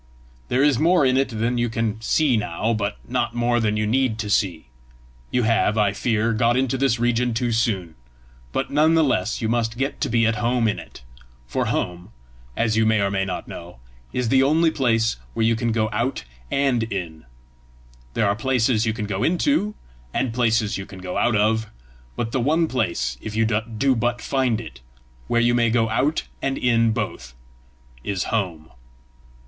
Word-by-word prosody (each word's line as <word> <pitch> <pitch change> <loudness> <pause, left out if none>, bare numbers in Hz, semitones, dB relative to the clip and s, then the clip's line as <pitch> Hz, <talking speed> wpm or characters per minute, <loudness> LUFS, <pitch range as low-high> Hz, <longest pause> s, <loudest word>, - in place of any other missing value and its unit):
There 130 +3 +2
is 145 -4 +3
more 170 -1 +4
in 130 0 +3
it 135 0 +2
than 115 +1 -1
you 120 0 +1
can 110 -1 -2
see 140 +2 +2
now, 105 +2 -1
but 100 - -2
not - - -1
more 120 0 +1
than 105 -2 0
you 105 - 0
need 120 0 +1
to 105 -2 -3
see. 90 -6 0 0.6
You 125 -1 +1
have, 110 -1 +2
I 105 -2 +2
fear, 115 +1 0
got 115 +2 +2
into 130 0 +1
this 130 -3 +1
region 120 0 +1
too 120 +1 0
soon, 110 -8 0 0.6
but - - -2
none 155 +3 +4
the 160 - +4
less 115 -4 0
you - - +1
must 115 0 -1
get 135 +2 -2
to - - 0
be 115 0 +2
at 110 -1 +1
home 120 +1 +1
in 105 - -1
it; - - -13 0.4
for 65 - -2
home, 90 0 -3 0.5
as 110 -2 +1
you 110 - +3
may 110 0 +3
or 100 -1 +1
may 95 -1 0
not 90 -2 -5
know, 85 -3 -9 0.3
is 125 -2 -1
the 135 +1 +4
only 160 +4 +3
place 115 - +1 0.2
where 110 - +1
you 115 0 +3
can 115 0 -1
go 110 -1 +1
out 120 +5 -1 0.3
and 135 -4 +1
in. 85 -5 -5 0.9
There - - +2
are 100 - +1
places 120 -1 +1
you 110 - +1
can 105 -2 -4
go 100 -1 -3
into, 210 - +1 0.4
and 125 -4 0
places 110 -3 +1
you 95 - -7
can 95 - -11
go 90 -1 -6
out 120 - +2
of; 110 +1 +1 0.5
but 115 - -3
the 130 - 0
one 160 +6 +2
place, 85 - -1
if 110 - -6
you 110 0 +2
do 115 +4 0
but 120 +1 0
find 130 -3 0
it, 110 - -10 0.5
where 120 0 +2
you 120 0 +3
may 120 -1 +3
go 115 -1 +2
out 145 +7 +1 0.2
and 135 0 -1
in 115 -2 +2
both, 65 - -4 0.7
is 100 -3 -2
home." 85 -8 -2
115 Hz, 195 wpm, -22 LUFS, 105-125 Hz, 0.9 s, more